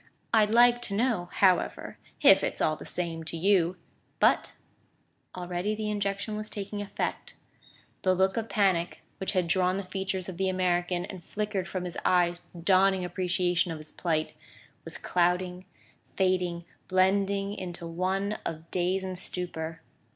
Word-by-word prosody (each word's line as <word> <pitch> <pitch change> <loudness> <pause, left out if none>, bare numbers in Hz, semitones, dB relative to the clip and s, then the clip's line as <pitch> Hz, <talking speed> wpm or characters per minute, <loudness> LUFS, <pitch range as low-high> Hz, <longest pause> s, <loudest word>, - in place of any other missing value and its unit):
I'd 215 -2 +5
like 240 +2 +5
to 200 - -2
know, 215 -6 +1
however 185 -3 +1 0.2
if - - +7
it's - - -2
all 155 - +2
the - - -10
same 165 -2 -2
to 165 - -4
you 180 -1 +3 0.2
" - - -41
But - - +3 0.8
already 180 +3 -2
the 215 0 -2
injection 200 +1 -2
was 215 0 -4
taking 205 0 -5
effect; 205 - -4 0.7
the 185 -1 +3
look 190 +1 +2
of 225 -1 -2
panic, 185 -5 +1 0.2
which 190 - -2
had 180 -3 +1
drawn 185 +2 +2
the 200 - -3
features 190 -1 -3
of 185 -3 -6
the 190 0 +1
American 180 -1 0
and 185 -3 -9
flickered 205 -1 -3
from 180 +1 -4
his 175 - -4
eyes 175 -1 +3
with 170 -1 -11
dawning 190 -1 +4
appreciation 180 -1 0
of 160 - -4
his 155 0 -11
plight, 160 -3 -1 0.5
was - - -6
clouding, 180 +1 0 0.5
fading, 180 -2 +1 0.2
blending 195 +1 +2
into 175 -4 -6
one 190 +5 -1
of 160 +1 -6
daze 185 +1 0
and 185 -1 -4
stupour. 165 -3 -5
185 Hz, 160 wpm, -28 LUFS, 175-195 Hz, 0.8 s, if